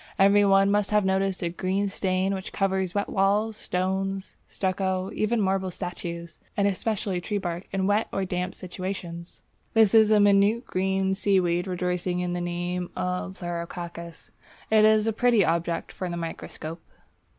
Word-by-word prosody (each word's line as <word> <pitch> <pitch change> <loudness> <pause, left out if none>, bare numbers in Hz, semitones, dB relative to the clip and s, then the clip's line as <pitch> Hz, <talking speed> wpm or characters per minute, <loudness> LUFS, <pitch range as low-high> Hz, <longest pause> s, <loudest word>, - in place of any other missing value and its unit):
Every 200 +1 +5
one 195 0 +4
must 205 0 +1
have 210 -1 +2
noticed 190 0 0
a 170 - 0
green 190 +3 -1
stain 190 0 0
which 190 0 -5
covers 190 -2 0
wet 205 - 0
walls, 205 +3 +1
stones, 190 0 -2
stucco, 190 0 -1
even 225 +2 0
marble 190 -1 +1
statues, 170 -2 -6 0.2
and 200 -1 +3
especially 200 -2 -1
tree 205 +4 -2
bark 175 -1 -4
in 195 -1 0
wet 205 +3 +2
or 195 - -1
damp 180 0 -3
situations. 180 -2 -6 0.3
This 220 -3 +5
is 220 -1 +6
a 215 -1 +5
minute 205 +4 +4
green 190 +1 0
seaweed 185 -2 +1
rejoicing 180 0 -1
in 180 0 -2
the 175 - -2
name 175 +1 -3
of 180 +1 -3
Pleurococcus. 170 -1 -6 0.4
It 215 -1 +6
is 215 0 +4
a 225 - +1
pretty 235 -3 +3
object 170 +1 -1
for 185 - -5
the 170 - -4
microscope. 165 0 -6
190 Hz, 160 wpm, -26 LUFS, 180-200 Hz, 0.4 s, is